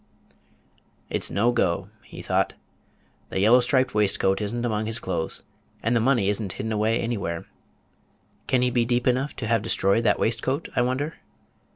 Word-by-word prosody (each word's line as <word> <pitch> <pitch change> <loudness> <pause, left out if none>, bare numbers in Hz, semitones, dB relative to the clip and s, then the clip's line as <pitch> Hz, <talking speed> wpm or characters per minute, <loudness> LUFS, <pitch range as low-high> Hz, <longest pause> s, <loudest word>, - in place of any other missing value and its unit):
"It's - - 0
no 115 +5 +2
go." 90 -4 0
he - - -10
thought. - - 0 0.7
"The - - -2
yellow 110 +6 +6
striped 130 +1 +2
waistcoat 95 -1 +2
is 105 -1 -2
n't 120 0 -2
among 110 -2 -1
his 110 0 0
clothes, 90 -7 -3 0.4
and 115 +2 +1
the - - +4
money 120 -4 +2
is 105 +2 +1
n't 100 -3 -4
hidden 110 - -4
away 110 +2 +1
anywhere. 100 -8 -3 1.0
Can 125 -1 +2
he 125 - +2
be 120 -1 +2
deep 120 +1 0
enough 130 +3 +1
to 115 - -5
have 115 -1 +2
destroyed 105 0 +2
that - - +4
waistcoat, 130 +7 -1
I - - +3
wonder? 130 +6 -1
115 Hz, 175 wpm, -25 LUFS, 105-125 Hz, 1.0 s, yellow